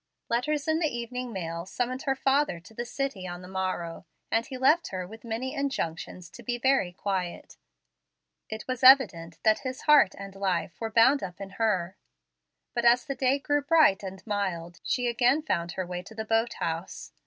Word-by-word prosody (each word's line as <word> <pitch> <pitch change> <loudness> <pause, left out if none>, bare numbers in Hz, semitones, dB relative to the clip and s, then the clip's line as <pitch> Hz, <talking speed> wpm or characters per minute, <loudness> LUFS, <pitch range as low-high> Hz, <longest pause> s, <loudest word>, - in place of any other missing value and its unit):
Letters 290 +6 0
in 315 0 +2
the 325 - +2
evening 245 -1 -4
mail 170 -3 -4
summoned 250 +5 -2
her 270 - +2
father 270 -8 +1
to 170 +6 -16
the 240 +2 -4
city 255 -9 -3
on 175 0 -7
the - - -9
morrow, 185 -3 -3 0.2
and 225 - +2
he 260 - -6
left 300 +7 +4
her 185 -1 -4
with 220 +4 -12
many 235 +3 -3
injunctions 180 - -3
to - - -11
be 245 -1 -2
very 260 -7 +2
quiet. 185 -1 -4 0.9
It 220 0 -6
was 255 0 -3
evident 195 - +6
that 215 -1 +4
his 255 -1 -5
heart 295 -10 +5
and 195 0 -8
life 190 -2 -2
were 225 - -2
bound 240 +5 +5
up 180 -2 -6
in 195 -1 -7
her. 195 -4 0 0.8
But 240 - -1
as 240 +1 +5
the 280 - -2
day 265 0 +2
grew 290 +1 0
bright 290 - +4
and 190 -1 -8
mild 175 -5 -3
she 245 - 0
again 245 +5 +2
found 170 - -1
her 185 - -3
way 180 0 -5
to 220 - -13
the 220 0 -4
boat 225 +2 +1
house. 165 +2 -4
225 Hz, 190 wpm, -28 LUFS, 185-260 Hz, 0.9 s, evident